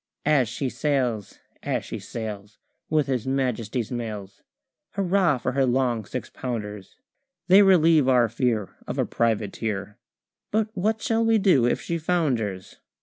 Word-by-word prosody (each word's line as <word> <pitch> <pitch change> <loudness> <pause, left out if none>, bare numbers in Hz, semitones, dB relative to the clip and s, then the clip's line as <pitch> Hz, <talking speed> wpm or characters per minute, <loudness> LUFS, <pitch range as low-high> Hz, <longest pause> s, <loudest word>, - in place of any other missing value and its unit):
As 140 -6 +3
she 135 +3 -3
sails, 125 -7 -1 0.2
as - - -2
she - - -6
sails 105 -2 -7 0.3
With 155 -2 +2
his 130 -3 -2
Majesty's 125 -3 -1
mails, 105 -5 -6 0.5
Hurrah 190 -5 +2
for 125 - -2
her 135 +1 +1
long 125 -3 +1
six 130 - -5
pounders! 105 -5 -6 0.5
They 190 +2 +8
relieve 165 -7 +5
our 125 -3 +4
fear 115 -3 -1
Of - - -4
a - - +2
privateer, 105 -1 -2 0.5
But 220 0 0
what 215 +2 -1
shall 230 -4 +1
we 225 0 +4
do 180 - +4
if - - +1
she 170 0 -3
founders? 125 - -1
125 Hz, 145 wpm, -25 LUFS, 110-160 Hz, 0.5 s, They